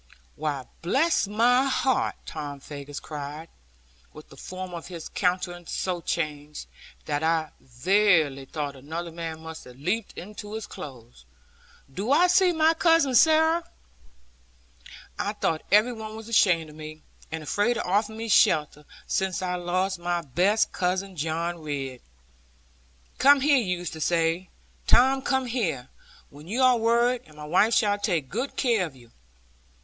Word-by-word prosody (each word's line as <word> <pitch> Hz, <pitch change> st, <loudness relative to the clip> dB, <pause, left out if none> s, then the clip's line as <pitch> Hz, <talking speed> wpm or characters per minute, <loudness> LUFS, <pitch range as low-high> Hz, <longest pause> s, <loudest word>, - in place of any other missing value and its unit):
'Why, 145 Hz, -4 st, -3 dB, 0.2 s
bless 270 Hz, -, +2 dB
my 240 Hz, +5 st, +3 dB
heart!' 265 Hz, -1 st, +1 dB
Tom 145 Hz, -2 st, -6 dB
Faggus 140 Hz, 0 st, -8 dB
cried, 150 Hz, +2 st, -7 dB, 0.6 s
with -, -, -13 dB
the -, -, -14 dB
form 185 Hz, 0 st, -7 dB
of 170 Hz, -1 st, -7 dB
his 170 Hz, -3 st, -7 dB
countenance 180 Hz, -2 st, -2 dB
so 180 Hz, -2 st, -2 dB
changed, 150 Hz, -3 st, -3 dB, 0.4 s
that 145 Hz, -1 st, -1 dB
I 160 Hz, -1 st, +1 dB
verily 150 Hz, -, +2 dB
thought 145 Hz, 0 st, -4 dB
another 160 Hz, +6 st, -6 dB
man 165 Hz, -1 st, -6 dB
must 160 Hz, 0 st, -9 dB
have 125 Hz, -, -13 dB
leaped 185 Hz, -, -3 dB
into 210 Hz, +2 st, -8 dB
his 220 Hz, -, -5 dB
clothes 125 Hz, -, -11 dB, 0.7 s
'do 205 Hz, -, -2 dB
I 325 Hz, +5 st, +6 dB
see 360 Hz, 0 st, +4 dB
my 320 Hz, -1 st, +3 dB
Cousin 330 Hz, -5 st, +3 dB
Sarah? 320 Hz, +4 st, +5 dB, 1.6 s
I -, -, -1 dB
thought 160 Hz, -1 st, -1 dB
every 215 Hz, +5 st, +5 dB
one 220 Hz, -1 st, -7 dB
was 220 Hz, 0 st, -9 dB
ashamed 175 Hz, -8 st, +3 dB
of -, -, -15 dB
me, 155 Hz, 0 st, -10 dB, 0.3 s
and 160 Hz, -1 st, -4 dB
afraid 205 Hz, +10 st, +1 dB
to 235 Hz, -, -2 dB
offer 205 Hz, +4 st, +1 dB
me 225 Hz, +1 st, -5 dB
shelter, 150 Hz, -7 st, +3 dB, 0.2 s
since 190 Hz, -1 st, -1 dB
I 180 Hz, -1 st, -1 dB
lost 180 Hz, +1 st, -1 dB
my 175 Hz, 0 st, -1 dB
best 185 Hz, -, +2 dB
cousin, 185 Hz, +1 st, -2 dB
John 165 Hz, +2 st, -2 dB
Ridd. 135 Hz, -4 st, -5 dB, 1.2 s
'Come 280 Hz, 0 st, +6 dB
here,' 285 Hz, 0 st, +4 dB
he 240 Hz, -, +1 dB
used 175 Hz, -2 st, -6 dB
to 160 Hz, -, -8 dB
say, 170 Hz, +2 st, +1 dB, 0.4 s
'Tom, 265 Hz, +2 st, +5 dB
come 265 Hz, -1 st, 0 dB
here, 205 Hz, -, -2 dB, 0.4 s
when 145 Hz, +3 st, -13 dB
you 240 Hz, +7 st, 0 dB
are 255 Hz, -1 st, +6 dB
worried, 235 Hz, +2 st, +2 dB
and 155 Hz, -1 st, -18 dB
my 150 Hz, -, -8 dB
wife 190 Hz, +9 st, +3 dB
shall 205 Hz, -3 st, +2 dB
take 170 Hz, -, -1 dB
good 245 Hz, +7 st, -3 dB
care 230 Hz, -8 st, +1 dB
of 145 Hz, -, -15 dB
you.' 120 Hz, -2 st, -18 dB
180 Hz, 155 wpm, -26 LUFS, 155-225 Hz, 1.6 s, I